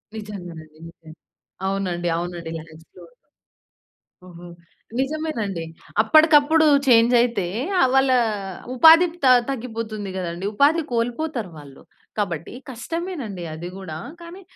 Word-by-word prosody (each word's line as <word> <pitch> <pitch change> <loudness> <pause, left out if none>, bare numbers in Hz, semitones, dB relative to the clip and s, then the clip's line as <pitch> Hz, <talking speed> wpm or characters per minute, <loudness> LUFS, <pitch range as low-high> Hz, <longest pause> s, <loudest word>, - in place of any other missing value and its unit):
నిజంగానండి. 175 -7 -9
నిజంగా. 160 -1 -15 0.5
అవునండి. 185 -3 -2
అవునండి. 170 -1 -5
ల్యాక్స్‌లో 160 0 -14 1.2
ఓహో! 175 -1 -12 0.5
నిజమేనండి. 265 - -2 0.4
అప్పటికప్పుడు 310 +5 +5 0.2
చేంజ్ 235 -1 +5
అయితే, 235 -6 +1 0.3
ఆ - - +5
వాళ్ళ 270 0 +4 0.6
ఉపాధి 325 +6 +8 0.2
త - - +5 0.2
తగ్గిపోతుంది 225 -5 -5
గదండీ! 175 0 -4
ఉపాధి 290 +8 +3
కోల్పోతారు 240 - -2
వాళ్ళు. 140 -2 -13 0.4
కాబట్టి, 175 -6 -3 0.2
కష్టమేనండి 260 - -5
అది 160 +3 -7
గూడా 185 -5 -7 0.2
కానీ, 340 +3 -11
215 Hz, 100 wpm, -22 LUFS, 175-275 Hz, 1.2 s, ఉపాధి